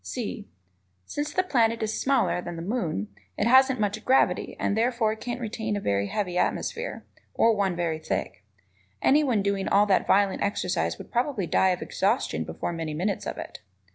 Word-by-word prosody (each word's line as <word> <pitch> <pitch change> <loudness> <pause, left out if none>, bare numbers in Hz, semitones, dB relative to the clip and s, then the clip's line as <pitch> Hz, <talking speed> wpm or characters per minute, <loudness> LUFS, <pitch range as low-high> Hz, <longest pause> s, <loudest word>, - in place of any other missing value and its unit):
(c) 215 -4 -5 0.6
Since 295 - -3
the 370 - +2
planet 230 -9 +1
is 215 0 -2
smaller 265 -9 +2
than 175 -1 -6
the 165 - -6
moon, 170 - -2 0.3
it - - +1
hasn't 260 +2 +5
much 210 +1 -1
gravity 265 - +2
and 200 - 0
therefore 225 -1 +1
can't 240 +2 -5
retain 220 -2 -3
a - - -1
very 100 - 0
heavy 180 - -2
atmosphere, 475 +2 -2 0.3
or 230 -1 +4
one 195 -3 0
very 170 -2 -1
thick. 95 -11 -4 0.6
Anyone 265 -8 +3
doing 200 -1 -1
all 205 +1 +4
that 195 -2 +2
violent 200 0 +3
exercise 175 - -1
would - - -11
probably 240 -5 0
die 190 +3 +3
of 180 -1 -1
exhaustion 215 +7 0
before - - -4
many 160 -2 -4
minutes 190 +5 -2
of - - -4
it. - - -8
205 Hz, 175 wpm, -26 LUFS, 180-240 Hz, 0.6 s, hasn't